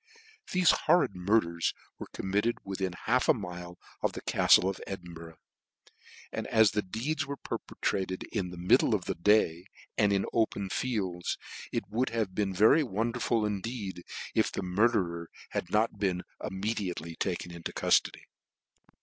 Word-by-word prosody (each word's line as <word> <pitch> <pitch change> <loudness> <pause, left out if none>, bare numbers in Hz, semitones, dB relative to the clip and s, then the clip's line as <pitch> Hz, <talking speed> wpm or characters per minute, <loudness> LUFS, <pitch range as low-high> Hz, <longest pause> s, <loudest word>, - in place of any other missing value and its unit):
Thele 185 -2 +4
horrid 175 - +4
murders 90 -3 +1 0.2
were - - -6
committed 105 +5 0
within 95 -2 -3
half 125 +3 +2
a - - +7
mile 90 -4 -7 0.2
of - - 0
the - - -6
caftle 95 - +5
of 95 - -3
Edinburgh, 85 -3 -8 0.9
and - - -4
ss 110 -2 +5
the 105 - 0
deeds 135 +10 -2
were 140 0 -4
perpetrated 95 -6 -3
in 95 -5 -1
/he 90 - -9
middle 90 +1 +4
of - - -3
the - - -1
day, 90 -2 +3 0.3
and 105 -2 +4
in 100 -1 +2
the - - -4
open 105 -4 0
fields, 95 -8 -2 0.3
it - - -1
would 120 +6 0
have 110 -5 -1
been 100 0 0
very 110 - +5
wonderful 115 -1 0
indeed, 100 -3 -4 0.3
if - - +2
the - - -3
murderer 90 -3 +1 0.2
had 85 - -3
not 105 +1 +1
been 95 -3 0 0.2
immediately 95 -4 -3
taken 90 -1 -2
into 85 -1 -6
cultody. - - +2
100 Hz, 150 wpm, -30 LUFS, 90-110 Hz, 0.9 s, a